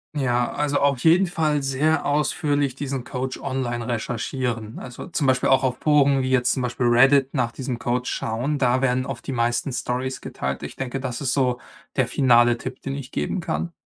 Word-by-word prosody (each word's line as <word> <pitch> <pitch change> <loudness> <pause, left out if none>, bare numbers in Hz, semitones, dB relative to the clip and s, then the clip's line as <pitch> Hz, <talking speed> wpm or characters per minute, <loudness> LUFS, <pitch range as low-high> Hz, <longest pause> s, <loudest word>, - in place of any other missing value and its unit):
Ja, 125 -4 +1
also, 145 -1 0
auf 140 -3 +2
jeden 175 +4 +6
Fall 155 -5 0
sehr 145 +3 +1
ausführlich 145 -2 0
diesen 135 -2 -4
Coach 130 +1 -4
online 120 -3 -3
recherchieren, 120 -1 -3
also, 125 +8 -8
zum 165 -4 -1
Beispiel 130 -1 +2
auch 135 0 +4
auf 125 -1 0
Foren 140 -3 +4
wie 130 - -1
jetzt 130 -1 +3
zum 130 - -2
Beispiel 125 0 -1
Reddit 135 +3 +5
nach 125 -4 0
diesem 125 -2 -4
Coach 125 +1 -1
schauen. 125 +7 -2
Da 130 0 +2
werden 130 0 +1
oft 120 -4 -6
die - - -3
meisten 120 +2 0
stories 125 +1 -3
geteilt. 65 0 -4
Ich - - -7
denke, 135 0 -4
das 125 -3 -4
ist 135 -4 -1
so 125 -3 +1 0.4
der - - +2
finale 120 -3 +4
Tipp, 130 0 -6
den 135 - -3
ich 135 -2 -7
geben 195 - -2
kann. 170 0 -3
130 Hz, 195 wpm, -23 LUFS, 125-140 Hz, 0.4 s, jeden